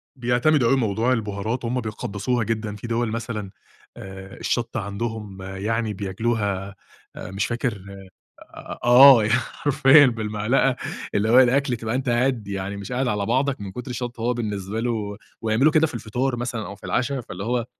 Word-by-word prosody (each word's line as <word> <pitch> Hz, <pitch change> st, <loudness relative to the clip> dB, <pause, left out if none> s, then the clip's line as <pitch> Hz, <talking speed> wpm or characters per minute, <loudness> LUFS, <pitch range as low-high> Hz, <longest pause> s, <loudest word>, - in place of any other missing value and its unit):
بيعتمدوا 125 Hz, +2 st, +2 dB
أوي 135 Hz, -, +4 dB
موضوع 115 Hz, +1 st, +1 dB
البهارات، 110 Hz, +2 st, -3 dB
هم 125 Hz, +2 st, -1 dB
بيقدسوها 110 Hz, +2 st, -2 dB
جدًا. 110 Hz, -1 st, -3 dB
في 105 Hz, +3 st, -8 dB
دِوَل 115 Hz, 0 st, 0 dB
مثلًا 110 Hz, -3 st, -4 dB, 0.5 s
آآ، 95 Hz, 0 st, -10 dB
الشطة 120 Hz, 0 st, -2 dB
عندهم 100 Hz, -1 st, -5 dB
يعني 105 Hz, +4 st, -2 dB
بياكلوها 100 Hz, -1 st, -2 dB, 0.4 s
آآ 90 Hz, -, -8 dB
مش 95 Hz, +1 st, -1 dB
فاكر 120 Hz, -4 st, -3 dB, 1.0 s
آه، 125 Hz, -1 st, +8 dB
ي 105 Hz, -, 0 dB
حرفيًا 135 Hz, +4 st, +4 dB
بالمعلقة، 115 Hz, +3 st, 0 dB, 0.4 s
اللي 105 Hz, +2 st, +1 dB
هو 125 Hz, +3 st, +8 dB
الأكل 130 Hz, 0 st, +3 dB
تبقى 110 Hz, 0 st, -3 dB
أنت 130 Hz, 0 st, -2 dB
قاعد 120 Hz, -3 st, +1 dB
يعني 100 Hz, 0 st, -4 dB
مش 100 Hz, +3 st, -7 dB
قاعد 125 Hz, +1 st, 0 dB
على 105 Hz, -3 st, -1 dB
بعضك 130 Hz, +2 st, 0 dB
من 100 Hz, -2 st, -6 dB
كُتر 125 Hz, +4 st, -7 dB
الشطة 120 Hz, -1 st, -5 dB
وهو 120 Hz, +1 st, +1 dB
بالنسبة 105 Hz, -2 st, -3 dB
له 110 Hz, -4 st, -2 dB, 0.3 s
ويعملوا 115 Hz, +7 st, +3 dB
كده 160 Hz, 0 st, +4 dB
في 150 Hz, -, -9 dB
الفطار 120 Hz, +3 st, -2 dB
مثلًا 120 Hz, -2 st, -4 dB
أو 100 Hz, -, -7 dB
في 100 Hz, -, -19 dB
العشا، 130 Hz, +9 st, -1 dB
فاللي 95 Hz, -5 st, -7 dB
هو 120 Hz, 0 st, -1 dB
115 Hz, 165 wpm, -23 LUFS, 105-125 Hz, 1.0 s, آه